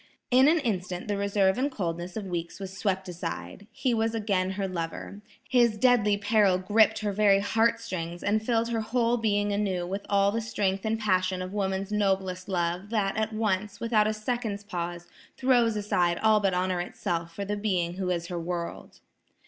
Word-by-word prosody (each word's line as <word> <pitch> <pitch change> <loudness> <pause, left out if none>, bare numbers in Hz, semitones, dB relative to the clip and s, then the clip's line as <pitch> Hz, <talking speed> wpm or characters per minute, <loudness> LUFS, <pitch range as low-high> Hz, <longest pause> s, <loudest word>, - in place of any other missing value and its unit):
In 260 +2 +6
an 325 +3 +5
instant 185 -7 -3
the 205 - 0
reserve 200 0 +2
and 275 +2 +1
coldness 175 -3 -4
of 210 - -4
weeks 170 -1 -4
was 190 -1 -7
swept 190 -1 -1
aside. 180 +3 -6
He 255 -3 -1
was 225 0 0
again 200 -4 0
her 195 0 -2
lover. 180 +3 -5 0.3
His 240 -4 +3
deadly 215 -4 +4
peril 205 -2 +3
gripped 215 +4 +3
her 210 -1 -1
very 200 -1 +4
heart 225 +3 +2
strings, 175 -6 -5
and 215 +2 +1
filled 230 0 +1
her 230 -1 -1
whole 235 +2 +1
being 205 -2 +1
anew 195 -4 -1
with 195 +3 -4
all 200 0 +3
the 230 +2 -1
strength 195 -3 -1
and 220 0 0
passion 185 -3 +1
of 185 +1 -7
woman's 195 0 -2
noblest 190 -2 0
love, 175 +1 -1
that, 210 -3 0
at 220 0 -1
once, 210 -2 -1
without 220 -2 +2
a 215 - 0
second's 215 -2 -3
pause, 175 -3 -5 0.3
throws 245 -4 +3
aside 180 -4 +1
all 220 -1 +5
but 195 -3 +1
honor 180 -1 0
itself 170 -1 -4
for 200 - -4
the 205 +1 -2
being 185 -5 -1
who 190 -1 -2
is 170 -2 -1
her 175 0 -4
world. 170 0 -5
200 Hz, 190 wpm, -27 LUFS, 185-220 Hz, 0.3 s, In